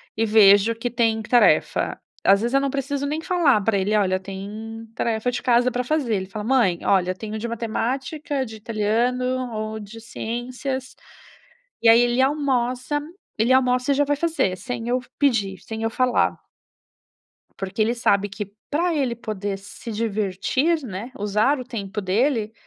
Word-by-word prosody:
e 225 - +1
vejo 210 0 +6
que 235 +2 -3
tem 225 -2 +1
tarefa. 240 +2 +3 0.2
Às 200 +1 +5
vezes 240 +3 -1
eu 275 - +5
não 275 - 0
preciso 280 +1 -2
nem 305 +2 -2
falar 325 - +3
pra 200 +1 +1
ele: 200 +3 +1
"Olha, 185 -2 +1
tem 210 +4 -7
tarefa 230 +1 -1
de 245 - -3
casa 245 0 +3
para 250 +1 -1
fazer", 265 -3 0
ele 190 - -2
fala: 210 +2 -6
"Mãe, 230 -9 +2
olha, 185 -2 +2
eu 185 - -7
tenho 220 0 -5
de 235 - -3
matemática, 260 +5 -2
de 220 -1 -9
italiano, 240 +4 -1
ou 215 0 -4
de 210 +2 -10
ciências", 250 +3 -5 0.9
e 230 - +3
aí 230 +1 +7
ele 240 +1 +1
almoça 265 -1 0 0.4
ele 230 +3 +1
almoça 250 0 +3
e 275 - +3
já 290 - +3
vai 290 +1 +1
fazer, 315 - 0
sem 235 +3 -5
eu 250 +1 +1 0.2
pedir, 215 -9 +1
sem 220 0 -7
eu 225 - 0
falar. 250 +2 +1 1.2
Porque 195 +2 -3
ele 235 +3 +2
sabe 200 -3 +2
que 200 0 -7 0.2
pra 340 +4 +1
ele 255 -5 0
poder 205 -4 -4
se 205 +4 -9
divertir, 220 - 0
né, 220 +1 -6
usar 210 +7 +1
o 255 - -6
tempo 215 -4 -5
dele 220 +3 0
230 Hz, 170 wpm, -23 LUFS, 210-255 Hz, 1.2 s, aí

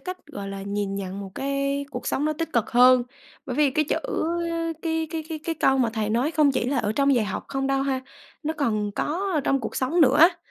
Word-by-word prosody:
cách, 365 -2 -7
gọi 200 -9 -7
là, 195 0 -6
nhìn 200 0 -2
nhận 195 0 -5
một 195 -1 -7
cái 275 +1 -1
cuộc - - -6
sống 285 - 0
nó 310 - +1
tích 325 +2 -4
cực 230 -2 +1
hơn. 250 0 +6 0.4
Bởi - - -4
vì 295 -2 +4
cái 305 +3 +1
chữ - - 0 0.8
cái 320 -1 -1
cái 325 -2 -3
cái 315 -1 -4
cái 330 - -1
câu 270 -3 +2
mà 235 -3 +2
thầy 215 -2 -1
nói 245 +7 +1
không 300 -4 +3
chỉ 255 - 0
là 265 +1 0
ở 210 -2 0
trong 280 +2 +3
dạy 235 -4 +2
học 195 - -4
không 270 0 -2
đâu 270 0 +1
ha. 270 -1 -1 0.4
Nó 310 +2 -1
còn 215 -7 0
có 375 +6 -1
ở 300 - +2
trong 275 -1 +1
cuộc 225 - -5
sống 305 +7 +1
nữa 275 -2 +5
á, 340 +2 +7
270 Hz, 250 wpm, -25 LUFS, 225-305 Hz, 0.8 s, á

